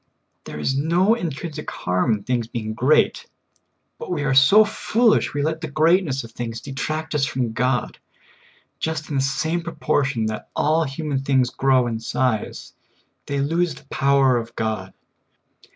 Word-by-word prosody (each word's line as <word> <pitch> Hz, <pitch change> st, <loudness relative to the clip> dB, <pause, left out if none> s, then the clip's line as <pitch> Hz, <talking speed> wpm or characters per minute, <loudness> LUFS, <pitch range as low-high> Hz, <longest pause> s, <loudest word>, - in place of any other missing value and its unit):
There -, -, -7 dB
is 135 Hz, -, 0 dB
no 170 Hz, +9 st, +3 dB
intrinsic 155 Hz, -, -4 dB
harm 90 Hz, +6 st, 0 dB
in 105 Hz, -2 st, -4 dB
things 120 Hz, -1 st, -1 dB
being 110 Hz, -2 st, -4 dB
great, 130 Hz, +7 st, +2 dB, 0.7 s
but 470 Hz, -, -7 dB
we 255 Hz, -, -1 dB
are 135 Hz, -2 st, +1 dB
so 195 Hz, +12 st, +7 dB
foolish 220 Hz, -3 st, +1 dB
we 145 Hz, -, 0 dB
let 160 Hz, +1 st, -2 dB
the 160 Hz, -, -4 dB
greatness 155 Hz, -2 st, +2 dB
of 115 Hz, -, -11 dB
things 115 Hz, -1 st, -5 dB
detract 155 Hz, +4 st, -4 dB
us 150 Hz, -2 st, +1 dB
from 125 Hz, -4 st, -1 dB
God. 125 Hz, +2 st, -1 dB, 0.8 s
Just 160 Hz, -1 st, -3 dB
in -, -, -2 dB
the 135 Hz, -, +2 dB
same 160 Hz, +5 st, -1 dB
proportion 145 Hz, -7 st, -1 dB
that 110 Hz, 0 st, -5 dB
all 160 Hz, +2 st, +2 dB
human 140 Hz, 0 st, -3 dB
things 130 Hz, -2 st, +1 dB
grow 130 Hz, -2 st, +2 dB
in 115 Hz, -2 st, -3 dB
size, 115 Hz, -1 st, -2 dB, 0.5 s
they 140 Hz, -1 st, -1 dB
lose 165 Hz, +4 st, 0 dB
the -, -, -15 dB
power 135 Hz, -2 st, +3 dB
of 115 Hz, 0 st, -6 dB
God. 110 Hz, -1 st, -3 dB
135 Hz, 160 wpm, -22 LUFS, 125-160 Hz, 0.8 s, so